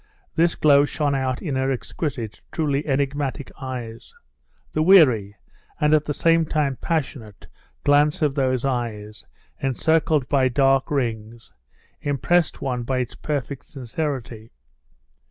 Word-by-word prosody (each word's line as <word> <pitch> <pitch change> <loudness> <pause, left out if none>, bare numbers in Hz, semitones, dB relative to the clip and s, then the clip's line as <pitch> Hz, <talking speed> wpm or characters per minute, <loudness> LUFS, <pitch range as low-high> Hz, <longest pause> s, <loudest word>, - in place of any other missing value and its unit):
This 165 0 +2
glow 145 -2 +5
shone 145 0 -1
out 130 -2 -2
in 150 -7 -2
her 130 0 0
exquisite, 130 - -4
truly 150 -2 -1
enigmatic 140 0 -2
eyes. 125 - -7 0.6
The 155 - 0
weary, 130 - +5 0.4
and 150 0 +3
at 150 -1 +3
the 145 - -2
same 165 0 +3
time 150 -3 0
passionate, 135 - -4 0.4
glance 145 +2 +3
of 145 -2 +2
those 130 -2 0
eyes, 110 -5 -4 0.3
encircled 155 +1 +1
by 135 -2 +3
dark 135 +1 +2
rings, 115 -4 -3 0.5
impressed 155 +4 0
one 125 -2 -2
by 130 +2 -2
its 125 -2 -2
perfect 145 -2 -4
sincerity. 130 -5 -5
135 Hz, 125 wpm, -23 LUFS, 125-150 Hz, 0.6 s, glow